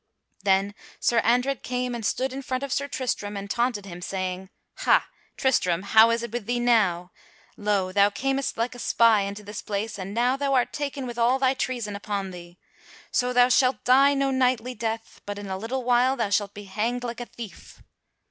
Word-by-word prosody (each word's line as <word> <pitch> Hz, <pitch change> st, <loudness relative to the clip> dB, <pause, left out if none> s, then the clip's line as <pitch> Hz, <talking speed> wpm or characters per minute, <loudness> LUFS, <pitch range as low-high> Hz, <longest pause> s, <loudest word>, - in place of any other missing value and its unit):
Then 195 Hz, 0 st, +2 dB, 0.3 s
Sir 235 Hz, -, +2 dB
Andred 250 Hz, +4 st, +1 dB
came 250 Hz, 0 st, -2 dB
and 235 Hz, -1 st, -5 dB
stood 260 Hz, +4 st, -1 dB
in 270 Hz, -, -5 dB
front 255 Hz, 0 st, -3 dB
of 280 Hz, -, -2 dB
Sir 280 Hz, -, -1 dB
Tristram 210 Hz, -7 st, -3 dB
and 200 Hz, 0 st, -5 dB
taunted 235 Hz, -1 st, -1 dB
him, 175 Hz, -2 st, -9 dB
saying: 185 Hz, 0 st, -4 dB, 0.3 s
"Ha, -, -, +3 dB, 0.3 s
Tristram, 185 Hz, -9 st, +1 dB
how 220 Hz, +3 st, +6 dB
is 230 Hz, 0 st, 0 dB
it 235 Hz, -, -5 dB
with 235 Hz, -3 st, -4 dB
thee 245 Hz, 0 st, 0 dB
now? 200 Hz, -7 st, +2 dB, 0.4 s
Lo! 205 Hz, -3 st, 0 dB
thou 200 Hz, +1 st, +4 dB
camest 270 Hz, +5 st, -2 dB
like 230 Hz, +3 st, -1 dB
a 245 Hz, -, -11 dB
spy 230 Hz, -3 st, +4 dB
into 200 Hz, +1 st, -5 dB
this 210 Hz, +1 st, -7 dB
place, 205 Hz, 0 st, -4 dB
and 195 Hz, +2 st, -6 dB
now 245 Hz, +2 st, +2 dB
thou 275 Hz, 0 st, 0 dB
art 250 Hz, -, +1 dB
taken 280 Hz, -2 st, -3 dB
with 240 Hz, -1 st, -6 dB
all 240 Hz, +3 st, +3 dB
thy 265 Hz, -1 st, +2 dB
treason 240 Hz, -6 st, -3 dB
upon 200 Hz, -1 st, -4 dB
thee. 175 Hz, 0 st, -11 dB, 0.5 s
So 250 Hz, 0 st, +1 dB
thou 245 Hz, 0 st, +5 dB
shalt 255 Hz, -1 st, +3 dB
die 275 Hz, +3 st, +5 dB
no 275 Hz, 0 st, +1 dB
knightly 255 Hz, -2 st, +1 dB
death, 225 Hz, 0 st, -5 dB
but, 205 Hz, 0 st, -4 dB
in 205 Hz, -, -7 dB
a 190 Hz, -1 st, -4 dB
little 235 Hz, +6 st, -3 dB
while, 250 Hz, +2 st, +3 dB
thou 225 Hz, -5 st, -2 dB
shalt 200 Hz, 0 st, 0 dB
be 205 Hz, -, -8 dB
hanged 225 Hz, +5 st, -2 dB
like 240 Hz, -1 st, -5 dB
a 240 Hz, -, -6 dB
thief." 230 Hz, -5 st, -11 dB
230 Hz, 205 wpm, -25 LUFS, 200-255 Hz, 0.5 s, how